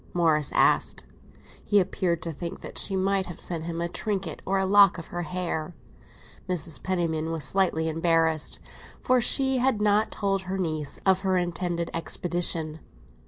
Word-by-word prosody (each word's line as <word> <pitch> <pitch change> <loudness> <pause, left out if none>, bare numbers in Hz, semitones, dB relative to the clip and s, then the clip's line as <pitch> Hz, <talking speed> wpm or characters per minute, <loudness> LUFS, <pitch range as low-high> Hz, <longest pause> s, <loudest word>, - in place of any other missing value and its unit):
Morris 160 -4 +2
asked. - - +2 0.6
He 205 - +3
appeared 180 -3 -1
to 165 - -3
think 170 +3 -7
that - - -6
she 195 - 0
might 190 0 +1
have 175 - -9
sent 165 -2 -3
him 170 0 -4
a 170 - -1
trinket 195 0 -3
or 195 +1 +1
a 190 - +1
lock 200 -1 +6
of 165 - -9
her 175 - -4
hair. 175 -1 -4 0.7
Mrs. 170 -3 0
Penniman 165 -4 -1
was 165 -2 -2
slightly 160 +1 +1
embarrassed, 165 -1 +1 0.4
for 255 -1 +2
she 265 +2 +4
had 255 -3 +2
not 210 +1 +2
told 195 -2 -1
her 190 +1 -4
niece 155 -5 -3
of 190 -1 +3
her 190 -1 +1
intended 175 -1 -2
expedition. 165 -2 -1
175 Hz, 165 wpm, -26 LUFS, 165-195 Hz, 0.7 s, lock